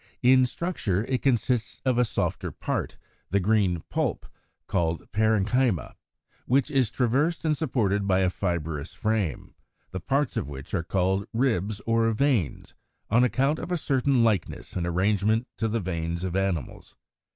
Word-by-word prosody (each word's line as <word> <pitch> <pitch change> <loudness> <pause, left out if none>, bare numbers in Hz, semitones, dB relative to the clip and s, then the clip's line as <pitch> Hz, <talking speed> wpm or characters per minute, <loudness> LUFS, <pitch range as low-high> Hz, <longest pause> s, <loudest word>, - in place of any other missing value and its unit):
In 130 0 +6
structure 120 - -2
it 130 0 -1
consists 120 -4 0
of 125 -2 +2
a 125 - +4
softer - - -2
part, - - -3 0.3
the 100 - +2
green 95 -4 +1
pulp, - - -1 0.4
called 85 -1 -1
parenchyma, 110 - +1 0.5
which 135 +4 +2
is 130 -5 +2
traversed 140 +9 0
and 155 -1 +2
supported 105 -10 0
by 95 -1 +3
a 90 -1 +2
fibrous 80 -5 -3
frame, 105 - -2 0.4
the 95 - -4
parts 140 - 0
of - - -2
which 70 -1 -9
are 90 - +1
called 95 +3 0
ribs 110 -4 0
or 115 0 +2
veins, 110 - 0 0.4
on 115 +3 +5
account 135 +4 +1
of - - -6
a 175 - +1
certain 135 -4 +2
likeness 110 -6 -1
in 85 -1 -1
arrangement 100 +6 +1
to 110 - 0
the 115 +1 -1
veins 85 -2 -3
of 95 -1 -3
animals. 95 -7 -2
110 Hz, 150 wpm, -26 LUFS, 95-125 Hz, 0.5 s, In